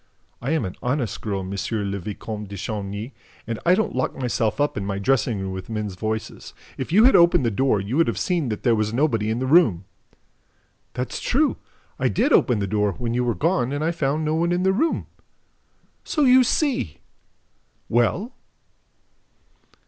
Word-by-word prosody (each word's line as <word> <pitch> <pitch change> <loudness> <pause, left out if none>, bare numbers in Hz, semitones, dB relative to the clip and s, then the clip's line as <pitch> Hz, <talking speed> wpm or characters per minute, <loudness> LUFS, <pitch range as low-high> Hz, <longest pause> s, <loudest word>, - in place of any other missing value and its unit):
I 125 - -3
am 160 -8 0
an 90 - -5
honest 125 -2 -2
girl, 100 -3 -2
M. 95 0 -6
le 100 0 -2
Vicomte 105 +2 -6
de 100 - -7
Chagny, 105 +4 -5 0.3
and 115 -1 -4
I 180 - +6
don't 220 - -1
lock 130 - -1
myself 120 -2 -1
up 145 0 +1
in 100 - -3
my 100 0 -3
dressing 110 +1 +1
room 95 0 -4
with 95 +1 -7
men's 105 -3 -3
voices. 110 +3 -5 0.2
If 130 - -5
you 210 +6 +6
had 260 - +6
opened 170 -6 +5
the 115 - +1
door, 130 0 +2
you 105 +8 -3
would 165 - +4
have 115 -5 -1
seen 165 - 0
that 105 - -4
there 120 - +4
was 110 0 0
nobody 115 -7 +1
in 110 - 0
the 130 - -2
room!" 130 - +4 1.1
"That's 125 0 -3
true! 290 +4 +1 0.4
I - - +2
did 290 - +1
open 125 - +4
the 100 - -1
door, 105 0 0
when 120 -2 -3
you 125 +1 +1
were 120 -2 0
gone, 160 -6 +1
and 145 +2 -2
I 165 - +1
found 155 -1 -1
no 155 - 0
one 170 +2 +1
in 175 +1 +1
the 190 0 +3
room." 315 +11 0 1.0
"So 300 - 0
you 255 -1 +6
see!... 240 - -1 0.9
Well?" 150 - +1
120 Hz, 190 wpm, -23 LUFS, 105-160 Hz, 1.1 s, I